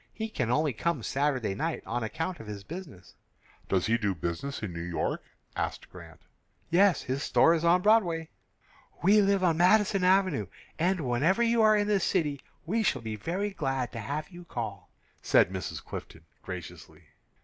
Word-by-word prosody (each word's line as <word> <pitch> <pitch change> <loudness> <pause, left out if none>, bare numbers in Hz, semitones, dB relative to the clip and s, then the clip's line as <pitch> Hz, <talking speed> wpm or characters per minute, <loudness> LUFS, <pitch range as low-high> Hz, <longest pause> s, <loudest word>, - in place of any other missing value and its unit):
"He 220 0 -3
can 125 - -2
only 145 +2 +2
come 150 +1 -1
Saturday 135 -6 0
night 160 +11 -3
on 120 +1 -2
account 160 +11 -3
of 110 - -10
his 105 -2 -7
business." 150 - -10 0.6
"Does 95 -2 +1
he 115 +1 +2
do 100 -4 0
business 85 - -4
in 95 -4 -4
New 85 - -5
York?" 85 0 -2 0.3
asked - - -4
Grant. - - -13 0.5
"Yes; 190 +1 +4
his 130 +2 -2
store 165 - +4
is 165 -1 -1
on 175 +2 +4
Broadway." 175 -7 +3 0.7
"We 205 +4 +6
live 200 -1 +2
on 165 -3 +3
Madison 195 +1 +4
Avenue, 185 - +3 0.3
and 180 +2 +1
whenever 145 - +2
you 230 0 +3
are 215 -1 +5
in 205 0 +1
the 205 -1 +3
city 150 -7 0 0.2
we 220 +7 0
shall 130 - 0
be 110 -1 -4
very 185 - -2
glad 135 -8 -2
to 115 - -6
have 145 +7 -4
you 175 -1 -11
call," 105 - -6 0.3
said - - +4
Mrs. 95 -2 -5
Clifton, 80 0 -8 0.2
graciously. 90 -4 -9
155 Hz, 175 wpm, -29 LUFS, 115-185 Hz, 0.7 s, We